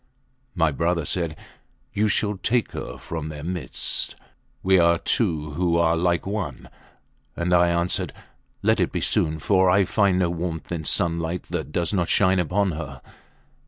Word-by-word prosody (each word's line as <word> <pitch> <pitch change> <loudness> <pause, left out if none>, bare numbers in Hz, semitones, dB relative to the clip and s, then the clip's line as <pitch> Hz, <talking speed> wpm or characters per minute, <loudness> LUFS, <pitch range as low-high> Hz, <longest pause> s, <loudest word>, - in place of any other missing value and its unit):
My 80 -3 +2
brother 85 +1 0
said, 85 -2 -2 0.6
You 105 +1 +2
shall 105 +1 +1
take 120 +4 0
her - - -6
from 80 -2 -5
their 75 -2 -7
midst. 90 +2 -2 0.5
We 95 0 +5
are 85 0 +4
two 80 -7 0
who 85 +2 +1
are 85 -1 +3
like 85 0 +1
one. 95 - -4 0.7
And 85 +1 0
I 85 0 +5
answered, 85 +1 0 0.5
Let - - +3
it - - +1
be - - -2
soon, 80 0 +1
for 95 +3 +3
I 95 +1 +4
find 100 -1 +2
no 90 -2 +1
warmth 85 -1 -4
in 80 -3 -3
sunlight 85 +2 0
that - - -3
does 85 +4 -1
not 90 -4 0
shine 95 -1 +3
upon 95 +3 +1
her. 70 -4 -6
85 Hz, 160 wpm, -24 LUFS, 80-95 Hz, 0.7 s, We